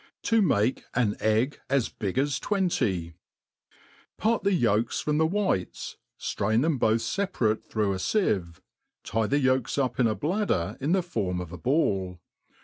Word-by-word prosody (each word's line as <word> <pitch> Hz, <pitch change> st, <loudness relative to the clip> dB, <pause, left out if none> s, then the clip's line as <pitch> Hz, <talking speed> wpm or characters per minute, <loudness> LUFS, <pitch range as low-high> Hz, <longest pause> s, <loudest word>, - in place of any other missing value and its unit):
To 225 Hz, -1 st, +3 dB
mah 115 Hz, -, +3 dB, 0.3 s
an 115 Hz, -4 st, +2 dB
Egg 110 Hz, +6 st, +1 dB
as 140 Hz, -4 st, +1 dB
hig 100 Hz, +2 st, -2 dB
as 140 Hz, +1 st, +1 dB
twaity: 115 Hz, -, 0 dB, 1.0 s
PART 225 Hz, +1 st, +1 dB
the 200 Hz, -, +1 dB
yolks 115 Hz, -, +1 dB
from 150 Hz, 0 st, 0 dB
the 160 Hz, -, +4 dB
whites, 190 Hz, -, -2 dB, 0.2 s
ftrain 110 Hz, +5 st, 0 dB
them 155 Hz, -4 st, +1 dB
both 110 Hz, 0 st, +3 dB
feparate 120 Hz, -, -1 dB
through. 105 Hz, -3 st, 0 dB
a -, -, -2 dB
fieve, 95 Hz, -, 0 dB, 0.4 s
tie 110 Hz, +1 st, 0 dB
the 140 Hz, -, +2 dB
yOlks 130 Hz, -2 st, +1 dB
up 130 Hz, -3 st, 0 dB
in 120 Hz, -, +4 dB
a 110 Hz, -, 0 dB
bladder 150 Hz, -, -1 dB
in 150 Hz, +6 st, +1 dB
the 190 Hz, -1 st, +2 dB
form 100 Hz, -, -2 dB
of 90 Hz, -2 st, -6 dB
a 90 Hz, -, -7 dB
ball. 95 Hz, -, 0 dB
120 Hz, 160 wpm, -27 LUFS, 105-160 Hz, 1.0 s, the